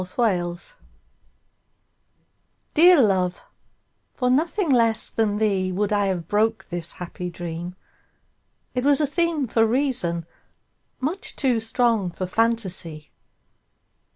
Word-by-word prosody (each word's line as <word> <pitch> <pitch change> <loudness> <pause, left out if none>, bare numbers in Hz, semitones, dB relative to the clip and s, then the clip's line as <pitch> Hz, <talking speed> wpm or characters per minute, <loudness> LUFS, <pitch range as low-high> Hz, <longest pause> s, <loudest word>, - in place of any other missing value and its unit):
The 185 0 -9
Dream 175 -7 0 2.2
DEAR 340 -2 +7
love, 185 -4 0 0.7
for 250 -1 0
nothing 330 +5 +1
less 230 -3 +3
than 210 -2 0
theeWould 200 -1 0
I 205 -1 +2
have 175 -4 -2
broke 215 0 +1
this 175 -2 -4
happy 180 0 -6
dream; 175 +1 -6 1.0
It 250 - -1
was 285 +1 +4
a 300 - +3
themeFor 285 -8 +1
reason, 235 - 0 0.7
much 315 +9 -3
too 255 -5 +2
strong 225 -3 +1
for 185 +2 -5
fantasy. 185 -7 -1
215 Hz, 105 wpm, -23 LUFS, 180-255 Hz, 2.2 s, DEAR